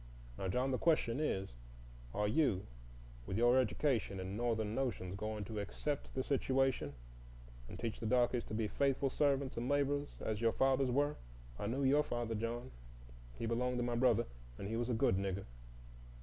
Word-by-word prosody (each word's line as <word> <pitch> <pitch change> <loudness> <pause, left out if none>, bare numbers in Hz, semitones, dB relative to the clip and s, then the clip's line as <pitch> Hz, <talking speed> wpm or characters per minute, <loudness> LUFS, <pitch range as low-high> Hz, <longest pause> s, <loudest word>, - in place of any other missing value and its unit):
Now, 95 - -3
John, 125 +8 +1
the 130 - 0
question 150 -7 +2
is, 95 -11 -1 0.6
are 105 +10 0
you, 110 -5 +2 0.6
with 95 - -1
your 120 +2 +5
education 110 -4 +1
and 95 +1 -4
Northern 110 -2 0
notions, 110 -8 -2
going 110 +1 -3
to 110 +1 -4
accept 140 +8 -3
the 130 - 0
situation 135 - +1 0.7
and 85 - -7
teach 115 -2 -3
the 110 - -2
darkies 125 0 +3
to 110 - -5
be 110 -1 0
faithful 135 +3 +1
servants 140 -3 +1
and 120 +2 -2
laborers 145 0 0
as 110 0 -2
your 115 -1 +3
fathers 135 0 +3
were,—I - - -2
knew 130 +5 -1
your 140 +3 +5
father, 120 -5 -2
John, 115 - -3 0.7
he - - -3
belonged 125 +2 0
to 120 - +1
my 120 0 -1
brother, 120 -2 +4 0.3
and 100 - -5
he 110 - -2
was 120 +1 -1
a 120 - +1
good 95 -4 +3
Nigger. 95 0 -2
120 Hz, 175 wpm, -36 LUFS, 105-135 Hz, 0.7 s, your